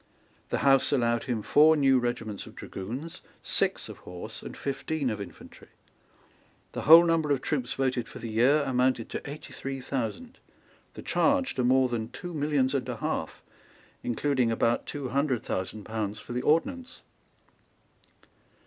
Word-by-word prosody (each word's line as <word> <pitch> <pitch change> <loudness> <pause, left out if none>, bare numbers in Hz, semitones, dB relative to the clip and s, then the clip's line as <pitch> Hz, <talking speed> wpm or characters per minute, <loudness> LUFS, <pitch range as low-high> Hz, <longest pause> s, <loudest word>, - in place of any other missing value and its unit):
The - - 0
House 135 -1 +4
allowed 120 -4 +1
him 115 -4 -2
four 155 +5 +5
new 135 -2 +4
regiments 120 -4 -3
of - - -13
dragoons, 125 - -7 0.2
six - - 0
of - - -10
horse, 90 0 -8
and - - -9
fifteen 140 -1 -2
of 105 -1 -4
infantry. 100 - -11 1.0
The - - -4
whole 165 +2 +11
number 165 -3 +1
of 140 -2 +2
troops 135 -4 -2
voted 130 -3 -1
for - - -10
the 115 - -6
year 130 +7 +4
amounted 125 -3 +1
to - - -4
eighty 150 -1 -9
three 135 0 -5
thousand, 135 - -4 0.6
the - - -8
charge 280 -1 +2
to 125 - -1
more 130 +1 +4
than 115 -2 -3
two 175 +7 -8
millions 145 -3 +1
and 130 -2 -1
a 120 - -3
half, - - -3 0.6
including 125 0 0
about 115 +1 +1
two 140 -3 -4
hundred 135 -2 0
thousand 95 +3 -3
pounds 105 -1 -3
for 120 - -8
the 125 - -1
ordnance. 255 - 0
130 Hz, 160 wpm, -28 LUFS, 120-150 Hz, 1.0 s, whole